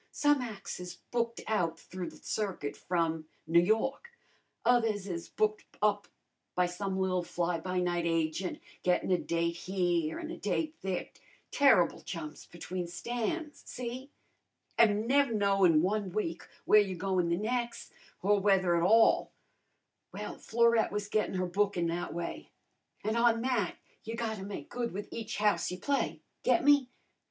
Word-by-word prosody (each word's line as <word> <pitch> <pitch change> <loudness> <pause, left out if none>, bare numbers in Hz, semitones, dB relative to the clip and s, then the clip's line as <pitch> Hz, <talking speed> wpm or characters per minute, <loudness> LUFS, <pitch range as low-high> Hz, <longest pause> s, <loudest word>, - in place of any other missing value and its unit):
Some 290 -2 +2
ac's 215 -7 -6
is 180 0 -7 0.2
booked 235 -1 -1
out 175 -7 0
through 185 -1 -6
the - - -14
circuit 190 -9 -3
from 165 -3 -1 0.2
N' 170 +2 +5
Yawk; 270 - 0 0.6
others 225 -5 +2
is 170 -3 -5
booked 215 0 0
up 205 -1 +1 0.5
by 180 - +3
some 190 +2 -3
li'l 185 -1 +1
fly 175 0 -1
by 185 +2 -2
night 175 -1 0
agent, 165 +2 -1 0.2
gettin' 180 +1 +1
a 180 - +4
date 170 0 -1
here 175 -4 0
an' 330 -1 -5
a - - -6
date 310 -2 -1
there, 190 -2 -2 0.4
terrible 265 - +4
jumps 160 -4 -7
between 175 +1 -5
stands, 245 - -3
see? 250 +2 -6 0.7
and 215 -1 +4
nev' 280 0 +4
knowin' 195 -6 +4
one 205 +1 0
week 175 -4 -3 0.2
where 215 - +7
you're 190 -3 -3
goin' 185 -1 0
the 170 - +1
nex', 235 +3 -2 0.3
or 205 +1 +4
whether 190 -3 +3
at 170 - +2
all. 225 +6 +5 0.8
Well, - - -6
Florette 235 0 +3
was 205 0 -3
gettin' 215 -2 0
her 185 0 0
bookin' 190 -1 +1
that 175 +1 -3
way. 170 +2 -5 0.5
An' 215 +1 0
on 235 -1 +3
that 240 -8 0 0.3
you 225 +1 -5
gotta 220 -3 -3
make 200 +1 -6
good 240 -1 -3
with 205 +2 -5
each 225 -1 -4
house 210 0 +2
you 180 - -4
play, 280 +9 -1 0.2
get 345 - +3
me? 285 -3 +5
200 Hz, 155 wpm, -31 LUFS, 175-230 Hz, 0.8 s, where